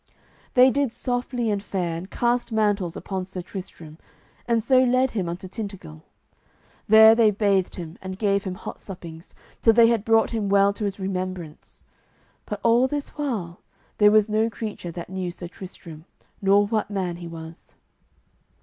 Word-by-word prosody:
They 255 Hz, +1 st, +7 dB
did 280 Hz, -3 st, 0 dB
softly 245 Hz, -2 st, -2 dB
and 200 Hz, -1 st, -1 dB
fair, 180 Hz, -4 st, -3 dB
and 175 Hz, +3 st, -7 dB
cast 240 Hz, +2 st, 0 dB
mantles 205 Hz, -5 st, 0 dB
upon 190 Hz, -2 st, -4 dB
Sir 185 Hz, -1 st, -7 dB
Tristram, 170 Hz, -4 st, -9 dB, 0.5 s
and 230 Hz, -2 st, +1 dB
so 255 Hz, +2 st, +4 dB
led 255 Hz, +1 st, +2 dB
him 190 Hz, -6 st, -2 dB
unto 175 Hz, +2 st, -6 dB
Tintagil. 195 Hz, -, -8 dB, 0.9 s
There 220 Hz, +1 st, +9 dB
they 225 Hz, -1 st, +5 dB
bathed 200 Hz, -2 st, +1 dB
him, 170 Hz, -2 st, -8 dB
and 190 Hz, 0 st, -6 dB
gave 200 Hz, -1 st, +1 dB
him 185 Hz, -2 st, -4 dB
hot -, -, -8 dB
suppings, 170 Hz, -4 st, -10 dB, 0.3 s
till 225 Hz, -, +5 dB
they 230 Hz, 0 st, +6 dB
had 230 Hz, -3 st, +1 dB
brought 225 Hz, 0 st, +3 dB
him 215 Hz, -4 st, -2 dB
well 200 Hz, 0 st, +4 dB
to 210 Hz, -, -4 dB
his 200 Hz, 0 st, -3 dB
remembrance. 185 Hz, -4 st, -5 dB, 0.6 s
But 210 Hz, -1 st, -5 dB
all 235 Hz, +3 st, +4 dB
this 290 Hz, +1 st, -4 dB
while 220 Hz, -, -4 dB, 0.4 s
there 210 Hz, -1 st, +7 dB
was 215 Hz, 0 st, +4 dB
no 220 Hz, +1 st, +1 dB
creature 215 Hz, -6 st, -6 dB
that 170 Hz, +1 st, -8 dB
knew 185 Hz, -1 st, -3 dB
Sir 175 Hz, 0 st, -8 dB
Tristram, 170 Hz, -3 st, -11 dB, 0.4 s
nor 200 Hz, +1 st, +4 dB
what 215 Hz, 0 st, -1 dB
man 185 Hz, -4 st, -3 dB
he 175 Hz, -1 st, -8 dB
was. 165 Hz, 0 st, -11 dB
200 Hz, 165 wpm, -24 LUFS, 180-225 Hz, 0.9 s, There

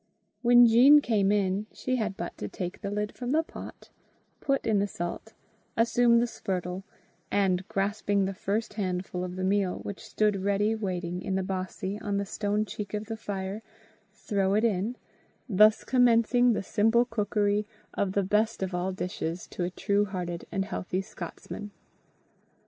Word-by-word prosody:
When 245 Hz, 0 st, +7 dB
Jean 250 Hz, +6 st, +8 dB
came 210 Hz, -7 st, +2 dB
in, 200 Hz, 0 st, +1 dB
she 255 Hz, 0 st, -2 dB
had 210 Hz, -4 st, -2 dB
but 175 Hz, -, -5 dB
to 105 Hz, -, -3 dB
take 180 Hz, -, -6 dB
the 200 Hz, -, -3 dB
lid 210 Hz, +1 st, -2 dB
from 245 Hz, -1 st, -6 dB
the 320 Hz, +1 st, +3 dB
pot, -, -, -10 dB, 0.5 s
put 275 Hz, -1 st, 0 dB
in 215 Hz, -3 st, +3 dB
the 200 Hz, -, +1 dB
salt, 175 Hz, +4 st, -5 dB, 0.4 s
assume 235 Hz, +1 st, +4 dB
the 235 Hz, -, +3 dB
spurtle, 185 Hz, -5 st, -4 dB, 0.5 s
and, 190 Hz, -2 st, +1 dB
grasping 200 Hz, 0 st, 0 dB
the 195 Hz, -, -2 dB
first 210 Hz, +4 st, -2 dB
handful 185 Hz, -3 st, -2 dB
of 180 Hz, 0 st, -5 dB
the 185 Hz, -, -3 dB
meal, 195 Hz, -1 st, +1 dB
which 200 Hz, -, -6 dB
stood 210 Hz, -2 st, +1 dB
ready 200 Hz, +2 st, +1 dB
waiting 180 Hz, -4 st, -3 dB
in 190 Hz, -, -2 dB
the 190 Hz, -, 0 dB
bossie 190 Hz, +1 st, -4 dB
on 205 Hz, -1 st, -1 dB
the 200 Hz, -, -1 dB
stone 205 Hz, +1 st, -1 dB
cheek 210 Hz, +1 st, -5 dB
of 210 Hz, +1 st, -3 dB
the 225 Hz, +1 st, -4 dB
fire, 200 Hz, -1 st, -4 dB, 0.5 s
throw 195 Hz, -2 st, 0 dB
it 215 Hz, -, +2 dB
in, 220 Hz, +1 st, +1 dB, 0.5 s
thus 215 Hz, 0 st, +5 dB
commencing 245 Hz, -1 st, +4 dB
the 210 Hz, -, -2 dB
simple 225 Hz, +4 st, +3 dB
cookery 210 Hz, -2 st, 0 dB, 0.3 s
of 195 Hz, -2 st, -1 dB
the 200 Hz, -, +2 dB
best 210 Hz, +2 st, +1 dB
of 190 Hz, -1 st, -3 dB
all 180 Hz, +2 st, -1 dB
dishes 180 Hz, -2 st, -4 dB
to 180 Hz, -, -4 dB
a 175 Hz, -, 0 dB
true 200 Hz, +3 st, +1 dB
hearted 180 Hz, -3 st, -5 dB
and 195 Hz, -1 st, -1 dB
healthy 185 Hz, -2 st, -3 dB
Scotsman. 190 Hz, +3 st, -8 dB
205 Hz, 170 wpm, -28 LUFS, 190-220 Hz, 0.5 s, Jean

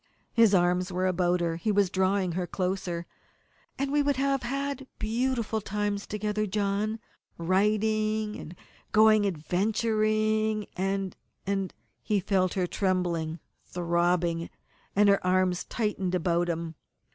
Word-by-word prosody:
His 225 Hz, -4 st, +5 dB
arms 180 Hz, +1 st, +2 dB
were 185 Hz, +1 st, 0 dB
about 180 Hz, -1 st, +1 dB
her. 165 Hz, -1 st, -1 dB
He 215 Hz, +5 st, 0 dB
was 200 Hz, -2 st, +2 dB
drawing 190 Hz, -1 st, +1 dB
her 180 Hz, +1 st, -2 dB
closer. 180 Hz, -2 st, -2 dB, 0.7 s
"And 275 Hz, 0 st, -1 dB
we 295 Hz, 0 st, +3 dB
would 285 Hz, -1 st, +1 dB
have 275 Hz, 0 st, +1 dB
had 275 Hz, +2 st, -3 dB
beautiful 230 Hz, 0 st, -1 dB
times 205 Hz, 0 st, -2 dB
together, 210 Hz, 0 st, -1 dB
John 205 Hz, +2 st, -1 dB, 0.4 s
writing, 215 Hz, +4 st, +1 dB
and 170 Hz, -, -9 dB, 0.4 s
going 215 Hz, -1 st, +6 dB
adventuring, 215 Hz, +4 st, +1 dB
and 195 Hz, 0 st, -1 dB, 0.3 s
and 195 Hz, -1 st, -1 dB, 0.2 s
" -, -, -47 dB
He 210 Hz, -2 st, +1 dB
felt 185 Hz, -1 st, +1 dB
her 185 Hz, -2 st, +1 dB
trembling, 175 Hz, -4 st, -1 dB, 0.3 s
throbbing, 170 Hz, -1 st, 0 dB, 0.5 s
and 205 Hz, +1 st, +5 dB
her 200 Hz, 0 st, +4 dB
arms 185 Hz, -1 st, +1 dB
tightened 195 Hz, -5 st, -1 dB
about 175 Hz, 0 st, +1 dB
him. 165 Hz, -1 st, -3 dB
195 Hz, 130 wpm, -28 LUFS, 180-215 Hz, 0.7 s, going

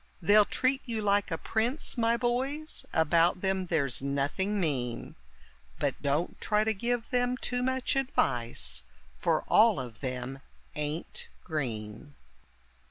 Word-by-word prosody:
They'll 205 Hz, +4 st, +6 dB
treat 265 Hz, +4 st, +1 dB
you 230 Hz, -3 st, -2 dB
like 205 Hz, 0 st, +2 dB
a 165 Hz, -, -2 dB
prince, 230 Hz, -, -1 dB
my 235 Hz, -1 st, +2 dB
boys, 265 Hz, +6 st, -1 dB
about 165 Hz, +3 st, +3 dB
them 190 Hz, -1 st, 0 dB
there's 140 Hz, -8 st, 0 dB
nothing 140 Hz, +9 st, -1 dB
mean; 130 Hz, -9 st, -2 dB, 0.6 s
But -, -, -1 dB
don't 150 Hz, +4 st, -1 dB
try 210 Hz, 0 st, +2 dB
to 220 Hz, 0 st, +1 dB
give 235 Hz, +2 st, -2 dB
them 245 Hz, 0 st, +1 dB
too 250 Hz, -1 st, -2 dB
much 260 Hz, +1 st, 0 dB
advice, 120 Hz, -, +1 dB, 0.4 s
for 165 Hz, -2 st, +1 dB
all 220 Hz, -4 st, +5 dB
of 120 Hz, -3 st, -7 dB
them 130 Hz, 0 st, -4 dB, 0.4 s
ain't 150 Hz, +2 st, -4 dB, 0.2 s
green. 125 Hz, -3 st, -4 dB
185 Hz, 130 wpm, -29 LUFS, -, 0.6 s, They'll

